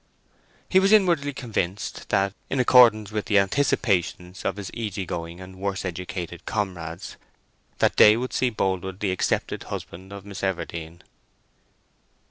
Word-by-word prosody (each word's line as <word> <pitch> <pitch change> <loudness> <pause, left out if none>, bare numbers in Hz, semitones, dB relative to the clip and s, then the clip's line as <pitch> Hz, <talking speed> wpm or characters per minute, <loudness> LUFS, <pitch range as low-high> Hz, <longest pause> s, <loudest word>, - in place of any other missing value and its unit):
He 190 - +5
was 195 +1 +3
inwardly 170 -9 +4
convinced 105 -8 -4
that, 95 0 +2 0.2
in 135 - -1
accordance 115 -5 +6
with 105 -1 -2
the 105 - +3
anticipations 95 -5 +1
of - - -1
his 100 -2 -7
easy 105 -4 -3
going 85 0 -5
and 95 0 -11
worse 95 0 -3
educated 90 -1 -5
comrades, 90 -4 -4 0.6
that - - +2
day 105 +1 +8
would 125 +2 -4
see 130 - +2
Boldwood 95 -3 -2
the 100 -3 0
accepted 95 - -1
husband 95 +3 -7
of 100 -1 -9
Miss 100 -1 -8
Everdene. 85 -3 -4
100 Hz, 140 wpm, -25 LUFS, 90-110 Hz, 0.6 s, day